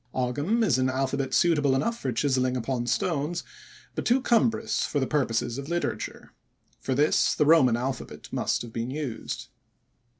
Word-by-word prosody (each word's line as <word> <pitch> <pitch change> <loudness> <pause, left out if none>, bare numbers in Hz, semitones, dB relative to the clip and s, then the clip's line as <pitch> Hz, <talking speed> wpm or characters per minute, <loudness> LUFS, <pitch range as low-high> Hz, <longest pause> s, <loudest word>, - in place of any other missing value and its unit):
Ogam 145 - 0
is 135 - +2
an 130 0 +2
alphabet 135 +1 -1
suitable 145 -6 +3
enough 230 +13 -1
for 130 - -2
chiselling 130 +1 +1
upon 120 0 -2
stones, 160 +5 -1 0.5
but - - -3
too 245 +2 +3
cumbrous 230 -2 +1
for 145 - -1
the 130 - +1
purposes 125 -3 0
of 140 +2 -7
literature. 175 0 -3 0.5
For 130 - -2
this 150 +3 +3
the 150 - +2
Roman 140 -7 +5
alphabet 130 +2 -5
must - - 0
have 115 -1 -10
been 115 +1 -3
used. 130 - -5
135 Hz, 160 wpm, -27 LUFS, 125-160 Hz, 0.5 s, Roman